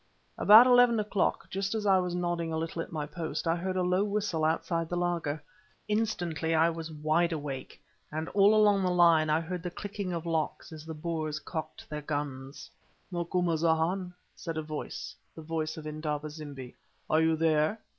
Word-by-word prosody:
About 220 +4 +8
eleven 245 -2 +5
o'clock, 205 -2 0
just 195 +3 -2
as 215 -1 -2
I 190 -2 +5
was 180 -1 -2
nodding 175 -2 -1
a 160 - -1
little 165 +1 -3
at - - -7
my 155 -3 -3
post, 155 0 -4
I 165 - +3
heard 185 +2 -3
a 185 - +1
low 180 +2 +2
whistle 205 -6 -1
outside 165 +1 0
the 175 - -2
laager. 170 -4 -1 0.4
Instantly 175 -7 -1
I 165 +1 +4
was 165 -1 -6
wide 155 +3 +1
awake, 145 -4 -5 0.3
and 155 +2 -3
all 205 +1 +5
along 205 -2 +5
the 185 - +1
line 170 -3 +5
I 155 +1 +3
heard 175 +1 -5
the 180 - -4
clicking 200 +1 -5
of 170 -1 -4
locks 165 0 -2
as 155 0 -10
the 160 - -5
Boers 155 -1 -3
cocked 155 0 -6
their 150 -1 -5
guns. 145 -2 -5 0.4
"Macumazahn," 170 0 0 0.2
said 165 -2 -5
a 155 - -2
voice, 155 0 -6 0.2
the 160 - -9
voice 160 0 -3
of 155 - -8
Indaba 155 0 -3
zimbi, 145 -5 -9 0.3
"are 155 - +3
you 160 0 +3
there?" 160 +4 +2
165 Hz, 185 wpm, -29 LUFS, 155-180 Hz, 0.4 s, About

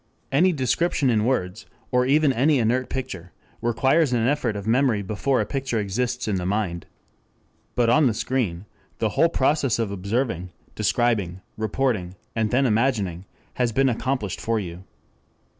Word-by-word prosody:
Any 170 +7 +4
description 140 -1 +1
in 110 -2 +2
words, 105 -6 -1 0.2
or 125 0 +2
even 145 0 +4
any 140 +4 +3
inert 125 +2 +1
picture, 95 -10 -5 0.3
requires 130 +6 +2
an 120 -1 +1
effort 140 -6 0
of 100 -1 -5
memory 115 -2 +2
before 115 +7 0
a - - +1
picture 135 -4 -2
exists 120 +5 -2
in 100 -3 0
the 90 - -3
mind. 95 -4 -2 0.9
But 120 -1 +2
on 150 +1 +5
the 115 - 0
screen 110 -6 -2 0.3
the 110 - 0
whole 165 +10 +3
process 140 -4 +1
of 115 -3 -1
observing, 100 -2 -2 0.2
describing, 100 -7 0
reporting, 110 -4 -1 0.2
and 110 -1 +1
then 130 +4 +2
imagining, 105 -7 0 0.4
has 120 -1 +2
been 135 +4 +3
accomplished 120 -5 -2
for 115 -1 0
you. 90 -1 -7
115 Hz, 155 wpm, -24 LUFS, 100-130 Hz, 0.9 s, on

